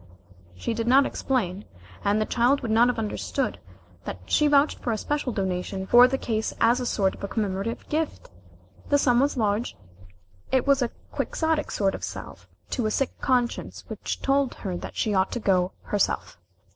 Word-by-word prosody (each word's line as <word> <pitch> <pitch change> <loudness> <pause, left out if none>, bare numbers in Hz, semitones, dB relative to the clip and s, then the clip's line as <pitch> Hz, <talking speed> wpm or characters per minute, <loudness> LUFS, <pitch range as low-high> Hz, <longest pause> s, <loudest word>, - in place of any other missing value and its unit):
She 90 - -3
did 230 0 -3
not 270 +3 +6
explain, 210 -7 -2 0.4
and 205 +1 +2
the 215 - +1
child 250 +5 +2
would 225 - -3
not 230 +2 +5
have 245 - 0
understood, 225 +4 -2 0.5
that - - -4
she 300 - +3
vouched 290 +1 +3
for 240 - -2
a 220 - 0
special 290 +1 -2
donation 190 -1 -2
for 240 +5 +7
the 270 +1 -1
case 220 -4 -2
as 235 +2 +4
a 250 - -2
sort 195 -4 +1
of 200 - -6
commemorative 205 +1 -2
gift. 310 0 -3 0.6
The 285 - +5
sum 245 -4 +3
was 280 +1 +1
large 215 +1 0 0.7
it 260 -2 +2
was 280 -1 +3
a 245 - +1 0.2
quixotic 320 -2 -1
sort 195 -2 +1
of - - -7
salve - - -7 0.2
to 240 -5 0
a - - +1
sick 265 +4 -1
conscience 245 -2 0
which - - -5
told 275 -1 +2
her 190 -4 -4
that - - -7
she 215 - 0
ought 190 0 +2
to 245 - -2
go 185 -3 +1
herself. 205 - -1
235 Hz, 185 wpm, -25 LUFS, 205-270 Hz, 0.7 s, for